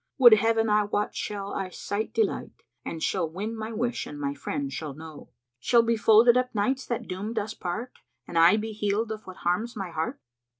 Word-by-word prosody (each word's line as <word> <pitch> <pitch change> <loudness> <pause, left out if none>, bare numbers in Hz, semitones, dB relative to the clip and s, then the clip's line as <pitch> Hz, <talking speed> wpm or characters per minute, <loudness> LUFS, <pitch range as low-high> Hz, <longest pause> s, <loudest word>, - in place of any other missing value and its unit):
Would 245 -4 +9
Heaven 225 +1 +3
I 210 -1 +3
wot 205 0 -2
shall 200 -1 -4
I 190 -1 -3
sight 205 +4 -4
delight, 445 - -2
* - - -53
And 165 -1 -4
shall 175 -5 0
win 205 +7 -4
my 220 0 -5
wish 235 +2 -2
and 145 - -8
my 140 -1 -2
friend 140 -1 -4
shall 150 -2 -5
know! 160 0 -11 0.3
Shall 235 - +4
be 230 0 +2
folded 225 +2 +6
up 250 -2 0
nights 260 +6 0
that 240 - -3
doomed 205 +5 -5
us 215 +2 -2
part 220 +6 -4 0.2
* - - -50
And 175 - -8
I 170 +5 +6
be 220 +1 -3
healed 210 +1 -1
of 215 0 -7
what 185 - -9
harms 215 +7 0
my 195 -4 -5
heart?" 160 0 -3
210 Hz, 215 wpm, -27 LUFS, 175-225 Hz, 0.3 s, Would